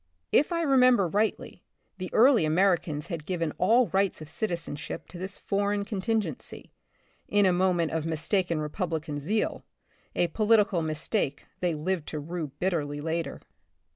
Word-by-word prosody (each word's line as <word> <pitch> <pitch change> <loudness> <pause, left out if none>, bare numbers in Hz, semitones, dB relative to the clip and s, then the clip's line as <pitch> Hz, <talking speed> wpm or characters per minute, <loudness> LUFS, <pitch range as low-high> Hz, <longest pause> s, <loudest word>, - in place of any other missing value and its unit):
(If 295 - +3
I 335 -1 0
remember 255 - +5
rightly 210 +5 -1 0.4
the 185 -1 -4
early 245 - +5
Americans 160 -2 +1
had 170 -5 -5
given 165 -4 -1
all 230 +7 +5
rights 195 0 +1
of 155 -1 -10
citizenship 165 -4 -4
to 175 - -9
this 190 +1 -5
foreign 200 0 -1
contingency, 205 - -3 0.6
in 205 -1 +3
a 185 - +4
moment 175 -2 +2
of 160 0 -2
mistaken 165 +1 0
Republican 155 -1 -3
zeal, 210 +10 -1 0.5
a - - +3
polit 220 +4 +4
ical 185 -5 -1
mistake 155 0 -1
they 175 -3 0
lived 165 +1 -2
to 155 - -4
rue 165 +1 -4
bitterly 145 -1 -2
later). 165 +2 -3
180 Hz, 145 wpm, -28 LUFS, 160-205 Hz, 0.6 s, remember